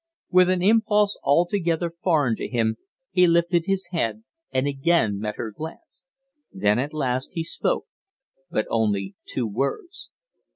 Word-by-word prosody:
With 185 0 +5
an 185 -1 +1
impulse 210 -1 +3
altogether 170 +1 +1
foreign 145 -10 +2
to - - -4
him 110 -2 0 0.3
he 180 -1 +5
lifted 170 +1 +2
his 195 -2 -1
head 115 - -1 0.3
and 130 0 +1
again 140 -7 +1
met 105 0 -3
her 115 -2 -5
glance. 160 - -10 0.5
Then 105 +3 +1
at 140 +3 -2
last 130 -2 -2
he 165 -2 -2
spoke, 165 - -1 0.6
but 110 -9 0
only 100 -3 0
two 125 - -1
words. 140 - -3
155 Hz, 140 wpm, -24 LUFS, 115-180 Hz, 0.6 s, With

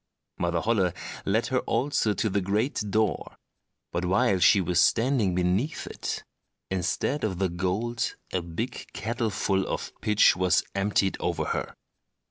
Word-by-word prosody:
Mother 85 -1 0
Holle 95 -5 +1 0.3
led 110 +4 +2
her 130 - +4
also 115 -4 0
to 110 - 0
the 100 -1 0
great 105 +9 0
door; 110 0 0 0.6
but 85 - -2
while 95 +1 +2
she 100 - +6
was 90 -1 +1
standing 115 -6 +2
beneath 90 - 0
it, - - -5 0.5
instead 95 - -1
of 100 -4 -1
the 95 0 +1
gold 95 +7 -1 0.2
a 95 - +1
big 85 +9 -5
kettleful 105 -4 -1
of - - -3
pitch 105 0 +5
was 90 -2 +2
emptied 100 0 +1
over - - -1
her. - - -3
100 Hz, 140 wpm, -27 LUFS, 90-115 Hz, 0.6 s, she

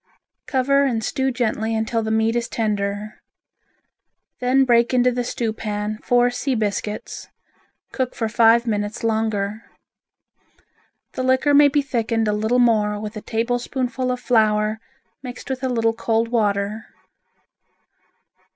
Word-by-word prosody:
Cover 275 +1 +2
and 235 -5 0
stew 265 +3 -1
gently 225 -3 -1
until 225 +1 -1
the 220 - -3
meat 220 +1 +1
is 235 -1 -1
tender. 210 -3 -3 1.2
Then 260 +2 +3
break 240 0 +3
into 250 0 +4
the 245 0 -2
stewpan 215 -2 -3
four 245 0 +3
sea 255 +2 -2
biscuits, 210 -1 -3 0.6
cook 260 -2 -3
for 225 - -1
five 230 +1 +4
minutes 205 -1 -2
longer. 220 -2 -1 1.5
The - - -4
liquor 260 +3 +2
may 290 0 +7
be 285 0 +1
thickened 230 -4 -1
a 210 - +1
little 220 +4 0
more 215 -4 +2
with 215 +1 -6
a 215 - -6
tablespoonful 245 +2 -2
of 250 - -3
flour 215 -3 +2 0.4
mixed 250 0 -8
with 265 0 -4
a 260 - 0
little 225 -2 +1
cold 225 0 0
water. 210 -2 -1
230 Hz, 135 wpm, -21 LUFS, 215-250 Hz, 1.5 s, may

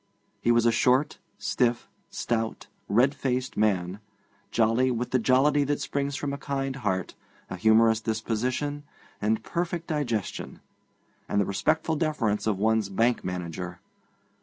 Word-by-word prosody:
He - - 0
was 120 0 +4
a 115 - +5
short, 130 +5 +2 0.2
stiff, 120 -1 0 0.2
stout, 115 -1 -2 0.2
red 125 +7 +4
faced 130 -2 -2
man, 95 -3 +1 0.5
jolly 115 +3 +2
with 120 0 -2
the 130 - +3
jollity 135 +5 +4
that 145 +1 0
springs 140 0 -2
from 145 -1 -3
a 140 - -5
kind 135 -1 -3
heart, 95 -8 -2 0.4
a - - -2
humorous 110 +3 +4
disposition, 120 +6 -2 0.4
a 110 +2 +2
perfect 170 +6 -3
digestion, 125 - -3 0.7
and 100 - +1
the 100 - +3
respectful 155 - 0
deference 135 -11 0
of 105 -3 +1
one's 110 0 +1
bank 115 +5 +1
manager. 90 -1 -5
120 Hz, 135 wpm, -27 LUFS, 110-140 Hz, 0.7 s, a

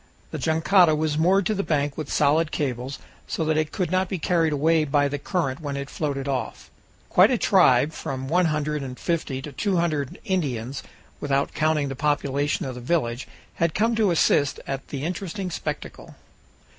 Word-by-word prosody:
The - - -4
jangada 160 +1 +4
was 155 -1 0
moored 185 +4 +3
to 215 - +1
the 200 - -1
bank 145 -5 -1
with 155 -3 -5
solid 155 +2 +2
cables, 130 -1 -3 0.3
so 160 - -2
that 155 0 +1
it 155 -1 0
could 180 -4 -2
not 185 0 +1
be 190 - -2
carried 165 -1 +1
away 155 +2 +2
by 145 -1 +2
the 145 0 -3
current 140 -5 -2
when 140 -2 -4
it 140 0 -6
floated 140 -3 -3
off. 135 -2 -4 0.4
Quite - - +6
a - - +2
tribe 130 +5 +4
from 130 -2 -5
one 175 +5 +3
hundred 150 -1 -1
and 130 -2 -6
fifty 155 -6 -2
to 150 - -7
two 190 +6 -1
hundred 155 -5 -1
Indians, 135 - -2 0.4
without 140 -1 0
counting 155 -2 +1
the 135 - -4
population 145 0 0
of 130 - -4
the 125 - -8
village, 120 -3 -1 0.3
had 165 -1 0
come 225 +2 +2
to 220 -3 +2
assist 145 -4 +2
at 135 -1 -5
the 140 -1 -5
interesting 185 +2 -4
spectacle. - - -6
150 Hz, 185 wpm, -24 LUFS, 140-170 Hz, 0.4 s, Quite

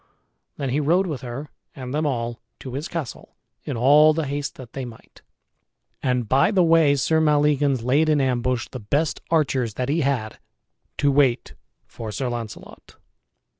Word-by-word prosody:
Then 135 -3 -3
he 140 - +1
rode 170 +6 +2
with 150 -7 -4
her 130 +4 -7 0.2
and 130 -2 -7
them 155 +1 0
all 120 -3 -3 0.2
to 130 - -8
his 145 +5 -4
castle, 165 -7 -6 0.3
in - - -3
all 150 +5 +6
the 160 -1 -1
haste 140 +1 -4
that 125 -3 -12
they 135 - -4
might. 120 -3 -12 0.8
And 125 -3 0
by 135 - +3
the 195 -4 +3
way 165 -4 +4
Sir 160 +4 +2
Maleagans 145 -4 +2
laid 145 +6 +2
in 150 -1 +3
ambush 125 -2 0
the 130 - -6
best 145 +9 -1
archers 135 -8 +1
that 125 +1 -2
he 160 +3 +1
had 130 -6 -2 0.6
to 145 0 +2
wait 135 -3 +2 0.3
for 110 -2 -8
Sir 125 +4 -3
Launcelot. 120 -3 -8
140 Hz, 170 wpm, -23 LUFS, 125-150 Hz, 0.8 s, all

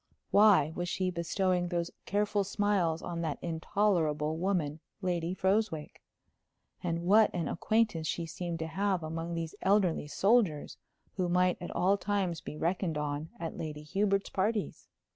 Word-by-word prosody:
Why 200 -8 +6
was 175 0 -2
she 185 0 -1
bestowing 180 +1 0
those 170 -1 -2 0.2
careful 205 +1 +1
smiles 195 -5 0
on 170 -1 -4
that 160 -3 -2
intolerable 160 -3 0
woman, 165 -4 -1 0.2
Lady 175 -1 -1
Froswick? 190 -5 0 0.8
And 170 -1 -2
what 210 +4 +6
an 170 -4 -1
acquaintance 215 -5 +1
she 170 +2 -2
seemed 170 +1 -4
to 160 - -3
have 190 0 0
among 165 +2 -4
these 165 -1 -4
elderly 190 -6 +2
soldiers, 195 -3 +2 0.4
who 180 -2 0
might 180 0 +2
at 175 - -5
all 195 +3 +2
times 190 -4 -1
be 150 - -7
reckoned 170 0 -1
on 150 +1 -3
at 165 -1 -5
Lady 150 -1 -5
Hubert's 195 +4 0
parties! 210 +2 -1
175 Hz, 145 wpm, -31 LUFS, 160-195 Hz, 0.8 s, Why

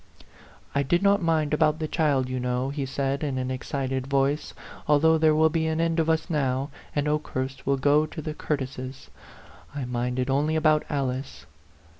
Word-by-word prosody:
"I 140 - +2
did 175 +7 +1
not 200 0 +4
mind 160 -3 +1
about 155 0 +3
the 155 -1 -3
child, 145 -6 +1
you 130 0 -3
know," 125 +2 -1
he 140 -2 -3
said, 140 +2 -2
in 140 -3 -1
an 130 0 -2
excited 130 0 -3
voice; 140 +2 0 0.2
" - - -16
al 150 - +6
though 160 +2 +4
there 155 -1 +4
will 160 0 +4
be 160 0 0
an 160 0 -1
end 165 0 +1
of 160 0 +1
us 160 0 +1
now, 135 -2 -1 0.2
and 145 0 0
Okehurst 135 -4 -3
will 140 0 +3
go 145 +3 +3
to 155 - -9
the 155 0 -4
Curtises. 130 -3 -4 0.7
I 140 -3 -3
minded 125 +1 -2
only 145 +4 +1
about 155 -1 +3
Alice." 135 - -3
145 Hz, 190 wpm, -26 LUFS, 130-155 Hz, 0.7 s, al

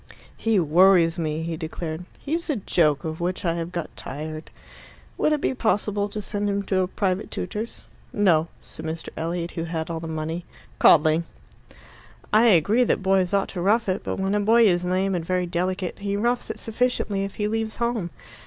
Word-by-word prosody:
"He 225 -3 +1
worries 170 +1 +5
me," 155 0 -2
he 165 0 -3
declared. 160 +1 -5
"He's 330 +4 -3
a 300 - +2
joke 165 - +1
of 160 0 -4
which 180 +2 -2
I 170 - +2
have 170 0 -4
got 170 -2 -5
tired." 155 +2 -6 0.7
"Would 305 - +1
it 300 -2 +1
be - - +1
possible 210 -4 0
to 210 0 -5
send 205 +1 -2
him 200 0 -1
to 190 -1 0
a 185 - 0
private 190 0 -1
tutor's?" 220 +2 -5 0.3
"No," 170 -6 +3
said - - -11
Mr. 160 0 -4
Elliot, 170 +1 -3
who 165 - -4
had 165 0 -3
all 165 - -3
the 165 - -6
money. 160 +2 -3 0.4
"Coddling." 160 +1 +5 1.1
"I 220 +3 +6
agree 210 +5 +4
that 215 - 0
boys 190 -2 +2
ought 200 -1 +1
to 180 - -5
rough 210 +5 +2
it; 185 0 -1
but - - -3
when 195 +1 0
a 210 - +2
boy 225 +3 +5
is 175 -3 +3
lame 185 +2 0
and 175 -2 -1
very 180 +1 0
delicate, 180 +1 -2
he 200 0 -2
roughs 240 +3 0
it - - -4
sufficiently 225 -3 -1
if 195 - -5
he 210 - -1
leaves 220 0 -2
home. 235 -6 -1
185 Hz, 195 wpm, -24 LUFS, 165-210 Hz, 1.1 s, I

